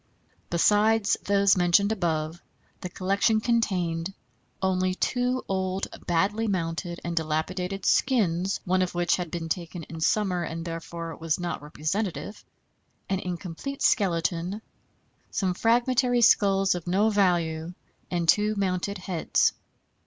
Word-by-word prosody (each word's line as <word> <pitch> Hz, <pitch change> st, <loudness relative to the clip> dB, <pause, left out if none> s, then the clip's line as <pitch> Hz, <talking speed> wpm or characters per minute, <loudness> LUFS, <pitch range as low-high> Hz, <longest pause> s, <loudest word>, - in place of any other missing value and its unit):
Besides 210 Hz, +4 st, +3 dB
those 200 Hz, 0 st, +4 dB
mentioned 180 Hz, +3 st, +3 dB
above, 165 Hz, -4 st, -1 dB, 0.4 s
the 180 Hz, -, -5 dB
collection 200 Hz, +5 st, +1 dB
contained 190 Hz, -6 st, 0 dB, 0.4 s
only 185 Hz, -1 st, +1 dB
two 250 Hz, +4 st, 0 dB
old, 190 Hz, 0 st, -1 dB, 0.2 s
badly 200 Hz, +6 st, +1 dB
mounted, 170 Hz, -2 st, -2 dB
and 170 Hz, -1 st, -3 dB
dilapidated 180 Hz, +5 st, -2 dB
skins, 195 Hz, -7 st, +2 dB
(one 185 Hz, 0 st, +2 dB
of 180 Hz, -1 st, -1 dB
which 175 Hz, -1 st, +2 dB
had 175 Hz, -2 st, -4 dB
been 165 Hz, 0 st, -4 dB
taken 170 Hz, 0 st, -4 dB
in 160 Hz, +1 st, -9 dB
summer, 185 Hz, 0 st, +1 dB
and 165 Hz, 0 st, -4 dB
therefore 165 Hz, -1 st, -6 dB
was 165 Hz, 0 st, -1 dB
not 175 Hz, -3 st, -3 dB
representative), 175 Hz, +7 st, -3 dB, 0.7 s
an 190 Hz, -1 st, 0 dB
incomplete 180 Hz, +9 st, -5 dB
skeleton, 180 Hz, +1 st, +1 dB, 0.7 s
some 185 Hz, -3 st, 0 dB
fragmentary 245 Hz, +3 st, +2 dB
skulls 195 Hz, -3 st, +4 dB
of 175 Hz, -1 st, -6 dB
no 200 Hz, +5 st, +2 dB
value, 175 Hz, -4 st, +1 dB, 0.3 s
and 175 Hz, -2 st, -1 dB
two 210 Hz, +5 st, +3 dB
mounted 195 Hz, 0 st, -1 dB
heads. 180 Hz, -2 st, +1 dB
185 Hz, 125 wpm, -26 LUFS, 170-200 Hz, 0.7 s, those